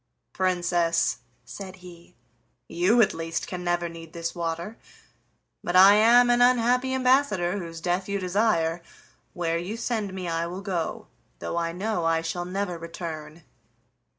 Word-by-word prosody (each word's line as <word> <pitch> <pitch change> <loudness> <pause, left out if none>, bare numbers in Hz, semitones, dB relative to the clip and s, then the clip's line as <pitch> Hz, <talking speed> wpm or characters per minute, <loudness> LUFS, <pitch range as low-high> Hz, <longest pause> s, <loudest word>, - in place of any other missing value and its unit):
"Princess," 175 -2 +1 0.3
said 190 +6 -9
he, 175 -2 -15 0.5
"you 190 +8 +3
at - - 0
least 165 0 -3
can 180 -1 -6
never 175 0 0
need 165 -1 -11
this 165 0 -4
water, 170 +4 -4 0.9
but 175 - -2
I 190 +2 +9
am 240 +3 +6
an 240 0 +3
unhappy 250 +1 +3
ambassador, 255 -8 +2
whose 165 -2 -7
death 180 +3 -2
you 200 - 0
desire. 180 -3 +1 0.5
Where 170 -1 -1
you 195 +6 -5
send 220 -4 -2
me 185 -1 -5
I 165 0 -1
will 180 +3 -6
go, 180 -5 -3 0.3
though - - -5
I 170 -1 -1
know 185 +1 -2
I 165 0 +2
shall 175 +2 -3
never 180 -1 -3
return." 165 -1 -7
180 Hz, 150 wpm, -26 LUFS, 170-205 Hz, 0.9 s, I